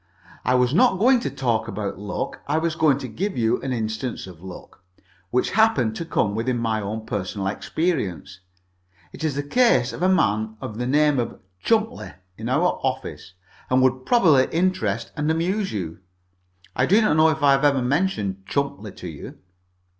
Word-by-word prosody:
I 125 - +2
was 125 +1 +2
not 190 +3 +4
going 250 +5 +4
to 235 - -3
talk 120 -5 -1
about 100 -2 -4
luck. 105 0 -4
I 145 +2 +1
was 165 0 0
going 155 -4 +3
to 130 - -6
give 190 - -3
you 115 -1 +1
an 135 - -3
instance 110 +1 -3
of 90 -3 -12
luck, 95 0 -11 0.5
which 125 - 0
happened 145 - +3
to 165 - -4
come 105 -9 0
within 120 +3 -1
my 110 -2 -1
own 110 +2 -5
personal 100 -1 -3
experience. 100 - -2 0.7
It - - -8
is 155 -4 0
the 145 - -2
case 145 - +3
of 115 - -7
a 185 - +3
man 110 - +1
of 110 +1 -7
the 125 - -1
name 145 0 +3
of 120 - -3 0.2
Chumpleigh, 225 +1 0 0.2
in 110 +4 -5
our 160 +7 +1
office, 130 -8 -4 0.4
and 130 0 +3
would 130 0 +1
probably 160 - +5
interest 160 - 0
and 150 +1 -1
amuse 185 +6 0
you. 85 -6 -5 0.8
I 130 - +2
do 200 +5 +5
not 215 -9 +3
know 160 +1 +5
if 155 -1 -2
I 140 - +6
have 135 +1 +3
ever 140 -3 +3
mentioned 125 - -1
Chumpleigh 110 -8 -3
to 90 - -8
you." 80 -4 -9
130 Hz, 185 wpm, -23 LUFS, 110-160 Hz, 0.8 s, I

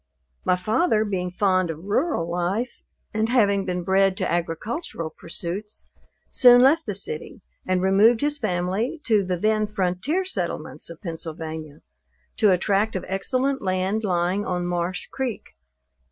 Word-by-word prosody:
My 180 - +3
father 215 - +1
being 185 -3 -2
fond 185 -1 +1
of 160 +1 -6
rural 205 - 0
life, 180 +8 -2 0.3
and 220 +1 0
having 200 -5 +3
been 180 -1 -2
bred 190 +1 +3
to - - -1
agricultural 170 - -3
pursuits, 180 +5 -6 0.5
soon 245 -1 +7
left 300 +4 +4
the 205 - -1
city, 180 0 -2 0.2
and 185 0 +1
removed 205 +5 +5
his 295 0 0
family 190 - -1
to 215 -4 +3
the 180 -1 -2
then 215 +3 +1
frontier 210 - -1
settlements 375 - -4
of 170 +3 -11
Pennsylvania, 160 -3 -6 0.6
to 215 - +4
a 185 - +4
tract 200 +3 +1
of 185 - -3
excellent 260 +8 -1
land 190 +3 -1
lying 180 +1 0
on 180 -2 -2
Marsh 175 +1 -2
creek. 260 -5 -3
195 Hz, 145 wpm, -24 LUFS, 180-220 Hz, 0.6 s, soon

